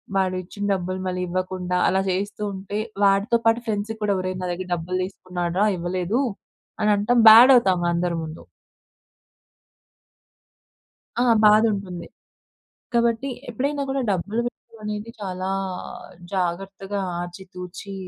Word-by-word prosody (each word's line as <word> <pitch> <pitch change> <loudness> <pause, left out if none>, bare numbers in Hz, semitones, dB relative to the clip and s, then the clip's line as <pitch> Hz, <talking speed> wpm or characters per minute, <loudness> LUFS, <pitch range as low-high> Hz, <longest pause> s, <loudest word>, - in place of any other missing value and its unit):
వాడు 190 -1 +1
ఇచ్చిన 200 +3 -8
డబ్బులు 185 0 -3
మళ్ళి 180 0 -2
ఇవ్వకుండా, 180 0 -2
అలా 190 - +2
జేస్తూ 200 +3 -2
ఉంటే, 195 +2 -5 0.3
వాడితో 200 +4 +4
పాటు 225 +1 +4
ఫ్రెండ్స్ 215 0 -2
కూడా 210 -1 +2
"ఒరేయ్! 185 0 -3
నా 180 - -2
దగ్గర 180 +1 -5
డబ్బులు 175 +2 -2
తీసుకున్నాడు‌రా 180 0 -2
ఇవ్వలేదు." 180 +7 -1 0.6
అని 215 -1 +2
అనటం 210 +5 +1
బ్యాడ్ 235 +5 +10
అవుతాము 185 -7 +3
అందరి 170 0 0
ముందు. 160 +1 -8 2.8
ఆ! - - +4 0.2
బాధ 210 +1 +7
ఉంటుంది. 180 -4 -6 0.9
కాబట్టి 235 +2 +1 0.2
ఎప్పుడైనా 280 +5 -2
కూడా 270 0 0
డబ్బులు 200 +4 -1
విషయం 230 -1 -20
అనేది 210 +1 -4
చాలా 185 -1 -4 0.8
జాగ్రత్తగా 195 +2 -2 0.2
ఆచితూచి 180 +2 -8
190 Hz, 120 wpm, -23 LUFS, 180-210 Hz, 2.8 s, బ్యాడ్